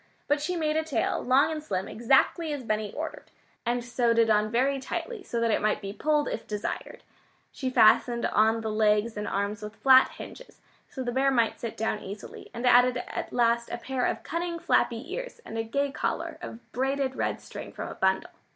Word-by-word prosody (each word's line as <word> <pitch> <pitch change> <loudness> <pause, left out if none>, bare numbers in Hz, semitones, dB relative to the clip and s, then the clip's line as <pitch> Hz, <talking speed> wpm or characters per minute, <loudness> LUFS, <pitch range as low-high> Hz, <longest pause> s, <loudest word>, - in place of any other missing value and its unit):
But 290 0 +2
she 360 +4 -1
made 310 -2 0
a 315 - +1
tail, 315 -3 -1
long 270 +5 +3
and 310 -1 -3
slim, 190 -8 -2
exactly 270 - +2
as 285 -3 -5
Benny 215 -2 -1
ordered, - - -6 0.4
and 240 0 0
sewed 240 -1 +1
it 225 -1 +4
on 210 0 +3
very 265 +4 +1
tightly, 430 - -5
so 235 -10 -3
that 230 -1 +2
it - - +1
might 215 0 +1
be 195 -1 -6
"pulled" 300 +5 +1
if 225 - -4
desired. 210 -1 -5 0.5
She 260 - -3
fastened 235 0 +4
on 220 +2 +3
the 220 -1 -3
legs 215 +1 +2
and 210 0 -4
arms 200 +2 -2
with 210 +1 -7
flat 260 +1 +6
hinges, - - -11 0.3
so 260 - -5
the 245 - -2
bear 265 +2 +2
might 235 -4 +1
sit 230 - -5
down 220 -1 -1
easily, 200 +1 -9
and 240 +1 -5
added 250 0 +5
at 245 - -5
last 235 -1 +2
a - - -3
pair 250 +1 -1
of - - -3
cunning 340 0 -3
flappy 275 0 0
ears - - -6
and - - -8
a 225 - -1
gay 280 +5 -1
collar - - -3
of 230 - -9
braided 265 +1 -1
red - - -1
string - - -9
from - - -6
a - - -6
bundle. 190 0 0
240 Hz, 205 wpm, -27 LUFS, 220-275 Hz, 0.5 s, flat